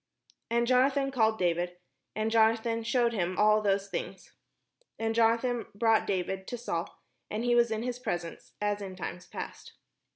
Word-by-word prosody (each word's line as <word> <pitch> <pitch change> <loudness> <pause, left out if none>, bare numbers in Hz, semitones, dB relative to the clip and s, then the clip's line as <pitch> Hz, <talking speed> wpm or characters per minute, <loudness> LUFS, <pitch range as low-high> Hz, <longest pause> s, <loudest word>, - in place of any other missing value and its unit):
And 235 +1 +2
Jonathan 270 +2 +3
called 220 -4 +2
David, 175 -1 0 0.4
and 215 +1 -1
Jonathan 225 +1 +3
shewed 235 0 +1
him 185 -3 -1
all 215 0 +5
those 200 -1 +1
things. - - -6 0.6
And 225 0 -1
Jonathan 230 +1 +2
brought 225 +1 +3
David 190 0 -2
to 245 - -4
Saul, 170 -8 -4 0.3
and 215 +2 -3
he 240 0 +2
was 240 -1 +4
in 220 0 -2
his 250 0 -3
presence, 175 -9 -5
as 205 0 -1
in 190 -2 -6
times 180 0 -6
past. - - -8
220 Hz, 160 wpm, -29 LUFS, 195-235 Hz, 0.6 s, all